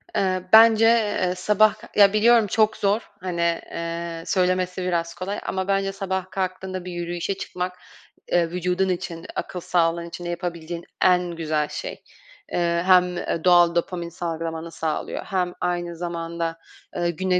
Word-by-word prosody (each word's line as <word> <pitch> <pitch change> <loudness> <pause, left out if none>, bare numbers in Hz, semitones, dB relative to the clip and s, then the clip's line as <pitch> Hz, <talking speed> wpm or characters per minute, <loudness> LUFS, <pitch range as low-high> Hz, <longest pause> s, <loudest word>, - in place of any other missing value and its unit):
Eee, 185 -2 +1
bence, 225 0 +8
eee, 210 -5 +2
sabah 210 +2 +3 0.2
Ya, 200 -1 +6
biliyorum 225 +1 +5
çok 220 +2 +2
zor. 205 +3 0
Hani, 170 -2 0
eee, 170 0 -4
söylemesi 185 -1 0
biraz 170 -2 -1
kolay 185 +3 -4
ama 190 0 -2
bence 195 0 +1
sabah 190 -1 -3
kalktığında 185 -1 -3
bir 180 - -5
yürüyüşe 175 +2 -3
çıkmak, 180 -1 -5 0.5
eee, 170 -1 +3
vücudun 180 +2 0
için, 170 -2 -4
akıl 180 - -4
sağlığın 170 -1 +1
için 175 +1 -8
de - - -3
yapabileceğin 170 -1 -5 0.2
en 180 -1 +3
güzel 155 -3 -1
şey. - - -6 0.5
Eee, 170 -1 +1
hem, 180 -1 +4
eee, 165 -2 -3
doğal 175 -1 +5
dopamin 170 0 -2
salgılamanı 165 -1 -4
sağlıyor 160 -2 -3
hem 180 -3 -1
aynı 175 -1 -2
zamanda, 165 -1 -4 0.4
ııı, 175 0 +1
güne 180 +2 0
180 Hz, 150 wpm, -23 LUFS, 170-190 Hz, 0.5 s, bence